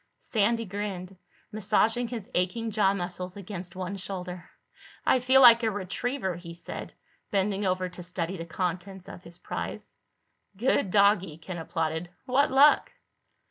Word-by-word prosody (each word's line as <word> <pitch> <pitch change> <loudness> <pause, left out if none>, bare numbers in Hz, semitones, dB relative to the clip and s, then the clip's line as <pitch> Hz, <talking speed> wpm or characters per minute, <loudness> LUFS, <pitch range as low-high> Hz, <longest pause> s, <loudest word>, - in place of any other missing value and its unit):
Sandy 230 +1 0
grinned, 195 -2 -5 0.4
massaging 220 +3 +2
his 225 -4 -6
aching 220 +6 0
jaw 205 -2 +3
muscles 180 0 -4
against 185 -2 -7
one 185 +1 -4
shoulder. 180 -2 -6 0.6
"I 260 - +4
feel 260 +2 +5
like 235 -2 +9
a 225 - +2
retriever," 205 0 -3
he 170 -1 -9
said, 170 - -8 0.3
bending 200 0 0
over 185 0 0
to 180 0 -9
study 180 +1 -3
the 165 -2 -6
contents 185 +2 -4
of - - -9
his 170 -1 -11
prize. - - -6 0.6
"Good 225 -3 +2
doggie," 200 -5 +3
Ken 175 +1 -7
applauded. 160 +1 -2 0.2
"What 275 +3 +3
luck?" 280 +3 +5
190 Hz, 140 wpm, -28 LUFS, 180-220 Hz, 0.6 s, like